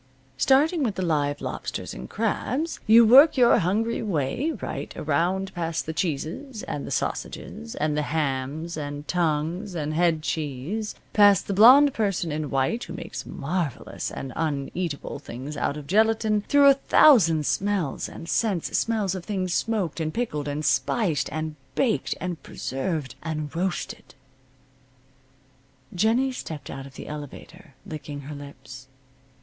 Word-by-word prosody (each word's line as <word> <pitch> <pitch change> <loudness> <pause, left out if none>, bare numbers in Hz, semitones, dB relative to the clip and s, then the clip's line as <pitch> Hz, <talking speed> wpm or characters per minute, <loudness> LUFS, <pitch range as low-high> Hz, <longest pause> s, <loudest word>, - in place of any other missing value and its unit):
Starting 285 - +3
with 225 -7 0
the 185 - -2
live 145 -3 0
lobsters - - -5
and - - -8
crabs 315 +6 -2
you 230 +2 +8
work 275 +7 +8
your 240 -1 +6
hungry 215 +6 0
way 185 - -1
right - - -6
around 180 +6 0
past 165 -2 -2
the 160 - -4
cheeses, 175 - -3
and 145 - -5
the - - -5
sausages, 75 +1 -4
and 150 0 0
the 150 - +1
hams, 150 +2 -2
and 145 0 -5
tongues, 175 +3 -1
and 155 -2 -2
head 165 -1 +2
cheese, 160 - -3 0.2
past 205 -3 +6
the 200 - -2
blonde 260 +8 +8
person 195 -6 -1
in 150 -1 -3
white 135 - 0
who - - -8
makes - - -7
marvelous 155 -3 -3
and 135 - -6
uneatable 155 0 -3
things 135 +3 -7
out 145 0 -1
of 150 - -8
gelatine, 215 +3 +2
through 285 0 +5
a 275 - +9
thousand 200 - +5
smells 195 -6 -1
and 165 - -10
scents 195 -3 0
smells 215 -5 +1
of 185 -2 -5
things 185 -2 -2
smoked, 205 -9 -1
and 155 -1 -3
pickled, 150 -12 -2
and 145 +1 -3
spiced, 155 - +1
and 155 0 -4 0.2
baked 245 -5 +1
and 180 -3 -4
preserved, 135 +1 -4
and 155 -1 -4
roasted. 190 +4 -3 1.8
Jennie 225 +8 +2
stepped 155 - -7
out 135 0 -7
of 135 - -16
the - - -8
elevator, 150 +2 -9
licking 145 -2 -7
her 145 +2 -8
lips. 130 -3 -11
165 Hz, 145 wpm, -25 LUFS, 150-215 Hz, 1.8 s, a